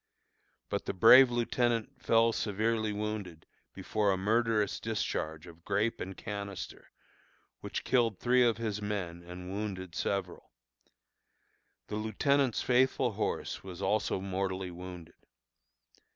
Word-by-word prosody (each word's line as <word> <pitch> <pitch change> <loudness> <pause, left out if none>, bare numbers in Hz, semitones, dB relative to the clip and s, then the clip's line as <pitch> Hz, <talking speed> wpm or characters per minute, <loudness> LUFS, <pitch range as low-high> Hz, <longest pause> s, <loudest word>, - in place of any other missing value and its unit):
But - - -2
the - - -3
brave 125 +6 +8
lieutenant 120 -1 0
fell 115 0 +4
severely 110 +1 0
wounded 105 -6 -4 0.3
before 105 -2 0
a 95 - +1
murderous 110 +1 +1
discharge 80 -8 -3
of 85 -1 -14
grape 105 +4 0
and 95 +1 -6
canister, 100 -3 -6 0.7
which - - -5
killed 115 -5 +2
three 125 +3 +3
of 115 -3 +3
his 110 -2 -3
men 95 -5 -3
and 90 +1 -8
wounded 95 -3 -4
several. 95 -1 -3 1.3
The 105 - -4
lieutenant's 125 +4 +1
faithful 125 0 +3
horse 100 - -3
was 90 -2 -8
also 105 -2 0
mortally 95 -1 -3
wounded. 90 -1 -9
105 Hz, 120 wpm, -31 LUFS, 95-115 Hz, 1.3 s, brave